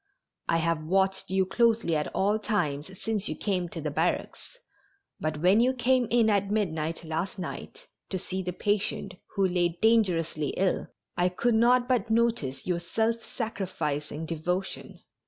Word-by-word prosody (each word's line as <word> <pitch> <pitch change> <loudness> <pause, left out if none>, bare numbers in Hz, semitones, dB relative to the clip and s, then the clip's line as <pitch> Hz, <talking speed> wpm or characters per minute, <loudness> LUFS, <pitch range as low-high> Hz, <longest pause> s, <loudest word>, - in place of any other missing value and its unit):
I 165 - +3
have 165 -1 0
watched 190 +3 +1
you 190 0 +2
closely 225 -4 +2
at 150 - 0
all 205 +3 +2
times 185 -5 -2
since 215 -3 -1
you - - -2
came 185 -4 -1
to 165 - -6
the 150 -1 -3
barracks, 165 - -2 0.6
but 155 -1 -2
when 190 +4 +6
you 250 +2 +4
came 250 0 +2
in 235 -2 +4
at 200 -2 +2
midnight 165 -6 -1
last 165 +5 -3
night 455 - -7 0.2
to 190 - -2
see 185 +1 -4
the 180 -1 -3
patient 200 0 -1 0.2
who 195 -2 +3
lay 175 -1 0
dangerously 175 -9 +2
ill 190 -1 +1 0.3
I 180 +1 +2
could 235 +7 +1
not 245 +2 +4
but 240 -4 +1
notice 225 - +1
your 180 -2 0
self 225 +6 -1
sacrificing 160 - -3
devotion. 180 +4 -3
190 Hz, 155 wpm, -28 LUFS, 165-220 Hz, 0.6 s, when